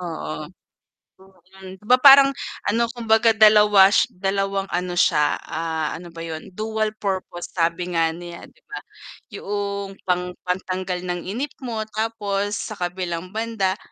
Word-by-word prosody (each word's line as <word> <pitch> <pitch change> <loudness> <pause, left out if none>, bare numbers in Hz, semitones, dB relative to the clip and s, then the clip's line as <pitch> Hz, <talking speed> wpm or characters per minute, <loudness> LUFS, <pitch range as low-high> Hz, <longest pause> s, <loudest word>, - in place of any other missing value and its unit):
Oo. 75 - -6 1.1
Mm, 190 0 -10
'di - - -24
ba 250 - +6
parang 275 0 +8 0.3
ano 230 +2 +1
kumbaga 225 -1 +3
2 210 -2 +6
sh 195 - +3
2 195 +1 -2
ano 180 0 -2
siya, 150 -4 +3
ah, 160 -1 -3
ano 175 +1 -9
ba 165 - -14
yun 160 -1 -7
dual 220 0 -1
purpose 190 -3 -4
sabi 175 +1 -1
nga 165 -1 +2
nila 170 +1 -9
'di - - -30
ba, 410 - -7 0.5
yuong 200 -1 -4
pang 180 0 -1
pantanggal 185 0 -3
ng 175 -1 -3
inip 260 +8 -4
mo, 225 -4 -3
tapos 205 -2 -2
sa 215 - -5
kabilang 180 -1 -4
banda 215 -3 -2
195 Hz, 140 wpm, -22 LUFS, 175-215 Hz, 1.1 s, parang